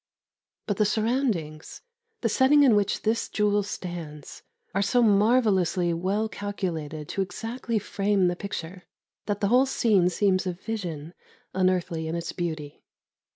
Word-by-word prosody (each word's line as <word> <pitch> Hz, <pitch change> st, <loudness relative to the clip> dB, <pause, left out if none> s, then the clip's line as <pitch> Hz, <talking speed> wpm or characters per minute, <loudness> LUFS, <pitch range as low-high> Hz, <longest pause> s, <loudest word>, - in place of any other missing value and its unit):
But 205 Hz, -, -2 dB
the 210 Hz, -, +3 dB
surroundings, 215 Hz, -, -1 dB, 0.4 s
the 230 Hz, -, +1 dB
setting 270 Hz, +6 st, +5 dB
in 250 Hz, -6 st, +6 dB
which 205 Hz, -1 st, 0 dB
this 220 Hz, +1 st, 0 dB
jewel 205 Hz, -1 st, +2 dB
stands, 175 Hz, -7 st, -7 dB, 0.3 s
are 195 Hz, -, +1 dB
so 240 Hz, +5 st, +3 dB
marvellously 200 Hz, -5 st, +3 dB
well 195 Hz, +6 st, 0 dB
calculated 170 Hz, -7 st, -4 dB
to 195 Hz, -, -1 dB
exactly 230 Hz, +4 st, -3 dB
frame 200 Hz, -2 st, +1 dB
the 175 Hz, -, 0 dB
picture, 180 Hz, -1 st, -6 dB, 0.4 s
that 205 Hz, -1 st, -2 dB
the 200 Hz, -, +2 dB
whole 255 Hz, +3 st, +4 dB
scene 205 Hz, -8 st, +3 dB
seems 185 Hz, 0 st, +1 dB
a 180 Hz, -, -1 dB
vision, 175 Hz, -5 st, -5 dB, 0.4 s
unearthly 180 Hz, -3 st, 0 dB
in 160 Hz, -, -3 dB
its 170 Hz, 0 st, -3 dB
beauty. 155 Hz, -5 st, -5 dB
195 Hz, 140 wpm, -26 LUFS, 175-215 Hz, 0.4 s, in